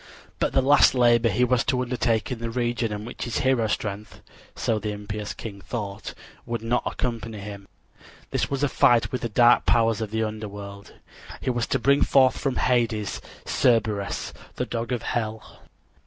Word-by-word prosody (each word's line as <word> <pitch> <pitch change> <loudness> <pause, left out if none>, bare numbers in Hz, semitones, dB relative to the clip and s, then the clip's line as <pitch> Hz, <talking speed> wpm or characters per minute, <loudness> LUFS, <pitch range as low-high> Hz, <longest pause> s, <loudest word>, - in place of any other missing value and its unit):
But - - 0
the 135 - +3
last 145 0 +6
labor 120 -1 +4
he 125 +5 +1
was 125 -1 +2
to 125 - +1
undertake 120 -1 0
in 125 - -3
the 115 0 -3
region 120 -1 -1
in 105 +1 -5
which 120 - -6
his 120 - -2
hero 130 -4 +3
strength 100 -2 -4 0.4
so 110 -2 0
the 105 0 -3
impious 105 0 -5
king 100 -3 -8
hoped 100 -4 -5 0.3
would 115 -2 -3
not 120 +2 +1
accompany 115 -3 -3
him. 100 -1 -8 0.6
This - - 0
was 140 0 -2
a - - +4
fight 120 -3 +3
with 125 - -3
the 120 - -2
dark 120 +2 +4
powers 115 -2 +3
of 110 - -3
the 110 +1 -1
underworld. 105 -2 -7 0.5
He 130 - -1
was 120 -1 -1
to - - +1
bring 140 +4 +3
forth 130 -2 +4
from 135 -2 -1
Hades 115 -5 0 0.2
Cerberus, 110 -5 +1 0.2
the - - -2
dog 115 0 -4
of 120 -3 -2
Hell. 110 -2 -4
115 Hz, 180 wpm, -25 LUFS, 105-125 Hz, 0.6 s, last